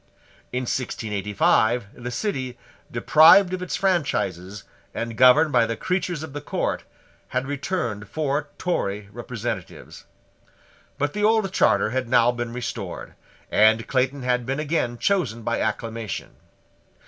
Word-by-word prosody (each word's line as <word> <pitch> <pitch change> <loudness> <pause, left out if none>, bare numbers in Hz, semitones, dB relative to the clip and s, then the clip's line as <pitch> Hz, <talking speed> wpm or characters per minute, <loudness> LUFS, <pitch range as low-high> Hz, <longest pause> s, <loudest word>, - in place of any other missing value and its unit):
In 125 +1 -2
1685 110 -1 0
the 120 0 -7
City, 130 - -3 0.3
deprived 160 +9 +6
of 185 - -3
its 180 - -3
franchises 105 - -1 0.3
and 115 -1 -4
governed 130 +6 +6
by 120 -3 +3
the 115 -1 -3
creatures 180 0 -2
of 160 -4 -8
the 145 - -5
court, - - -2 0.4
had 130 +1 -2
returned 135 - -3
four 145 +2 -2
Tory 105 - -2
representatives. 120 0 -6 0.9
But 145 +1 -1
the 210 - -2
old 215 -3 +2
charter 110 - +3
had 130 -1 -2
now 120 -1 +5
been 120 -1 -4
restored; 125 0 -6 0.4
and 110 +1 +4
Clayton 130 +1 0
had 125 0 +1
been 135 +4 -3
again 145 -6 -1
chosen 130 - 0
by 115 +1 -1
acclamation. 115 0 -3
125 Hz, 130 wpm, -24 LUFS, 115-150 Hz, 0.9 s, deprived